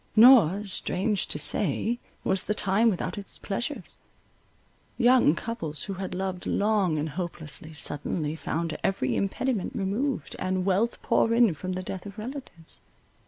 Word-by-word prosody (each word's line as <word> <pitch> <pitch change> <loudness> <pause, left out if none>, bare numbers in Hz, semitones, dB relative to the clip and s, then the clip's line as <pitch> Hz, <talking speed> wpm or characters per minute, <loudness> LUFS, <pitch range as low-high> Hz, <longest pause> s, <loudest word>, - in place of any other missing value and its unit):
Nor, 215 -5 +7
strange 195 +1 -1
to - - -1
say, 215 - +1 0.2
was 190 -1 +1
the 210 - 0
time 210 +4 +3
without 200 0 -2
its 200 - -6
pleasures. 240 +8 -4 1.0
Young 245 - +5
couples, 165 -10 -4
who 200 - -4
had 190 -1 -5
loved 185 -1 -3
long 200 -6 +2
and 150 +1 -1
hopelessly, 160 -2 -6
suddenly 150 +1 -2
found 165 0 -3
every 160 -10 0
impediment 205 +2 -1
removed, 205 - -1
and 185 0 -1
wealth 200 +5 +1
pour 225 - +2
in 230 -6 +5
from 185 +4 -5
the 185 0 -4
death 190 +1 -6
of 200 +1 -10
relatives. 225 - -7
195 Hz, 145 wpm, -27 LUFS, 170-220 Hz, 1.0 s, Nor